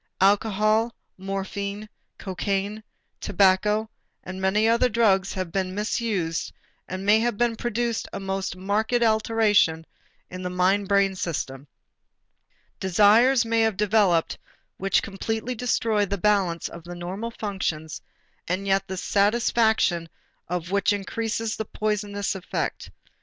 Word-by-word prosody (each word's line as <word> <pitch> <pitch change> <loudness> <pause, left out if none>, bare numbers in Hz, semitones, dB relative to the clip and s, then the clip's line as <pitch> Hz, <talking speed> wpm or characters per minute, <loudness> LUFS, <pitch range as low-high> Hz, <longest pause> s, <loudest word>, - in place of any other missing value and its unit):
Alcohol, 215 +3 +2 0.2
morphine, 200 +2 -4 0.3
cocaine, 195 +2 -3 0.4
tobacco, 205 +3 +2 0.4
and 185 +1 -7
many 205 +3 +2
other 235 +2 +3
drugs 205 -4 +2
may - - -9
have 175 -3 -5
been 185 0 -2
misused 205 -6 -1 0.4
and 185 +1 -5
may 210 +2 +5
have 235 -2 0 0.2
produced 240 -1 -1
a - - -5
most 195 -1 -3
marked 215 +6 0
alteration 220 -7 +2 0.5
in 185 0 -6
the 180 - -3
mind 185 +2 +1
brain 200 -1 +3
system. 145 -6 -4 1.1
Desires 220 +7 +4
may 230 0 +1
have 220 -3 +1
developed 200 -5 +2 0.4
which 195 0 +1
completely 220 +4 -3
destroy 225 -3 +1
the 200 0 -2
balance 195 -6 +1
of 170 - -10
the 175 +1 -8
normal 185 +6 -5
functions 190 -8 -4 0.5
and 185 +3 -2
yet 195 0 +1
the 190 0 -5
satisfaction 205 -4 +2 0.4
of 175 0 -4
which 200 +2 +2
increases 220 +2 -2
the 220 - -3
poisoning 210 -1 -2
effect. 195 -2 -3
200 Hz, 125 wpm, -25 LUFS, 185-220 Hz, 1.1 s, may